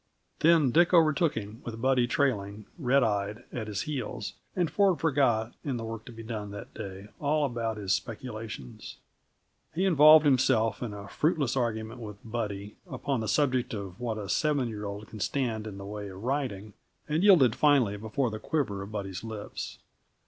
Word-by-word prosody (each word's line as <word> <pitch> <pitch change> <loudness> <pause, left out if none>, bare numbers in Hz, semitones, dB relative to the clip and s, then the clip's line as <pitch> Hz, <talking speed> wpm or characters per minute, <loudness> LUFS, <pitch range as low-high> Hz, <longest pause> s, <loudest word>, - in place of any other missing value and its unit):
Then 160 -5 +5
Dick 175 +5 +5
overtook 160 -1 +4
him 110 +1 -6
with 115 -1 -6
Buddy 130 0 +3
trailing, 105 -6 0
red 135 -1 +3
eyed, 105 0 -1
at 110 -3 -4
his 100 -2 -2
heels, 125 -6 -4 0.2
and 180 -2 +2
Ford 195 -4 +3
forgot, 125 -7 +2
in 135 -4 -2
the 115 - -5
work 115 -1 -6
to - - -9
be 115 -1 -9
done 110 -2 -5
that 100 0 -9
day, 95 +1 -8
all 150 0 +2
about 115 -4 -2
his 100 -3 0
speculations. 110 - -6 0.8
He 185 +4 +1
involved 155 -3 +8
himself 125 -5 +3
in 120 -3 -3
a 100 -1 -8
fruitless 150 - 0
argument 115 -1 -2
with 105 -2 -7
Buddy, 105 -3 -4
upon 140 -3 -2
the 110 - -3
subject 130 -5 +1
of 95 -3 -7
what 115 -3 -2
a 105 -2 -5
seven 145 +2 +1
year 105 -1 -5
old 100 +1 -6
can 110 - -10
stand 110 -2 -1
in 100 -2 -7
the 100 - -8
way 105 0 -6
of 95 +1 -9
riding, 120 -7 -2 0.3
and 155 +2 +1
yielded 160 - +6
finally 135 -9 +4
before 110 +4 -1
the 110 - -5
quiver 120 -11 -1
of 100 +2 -7
Buddy's 95 -3 -5
lips. 110 -2 -6
115 Hz, 180 wpm, -29 LUFS, 105-140 Hz, 0.8 s, involved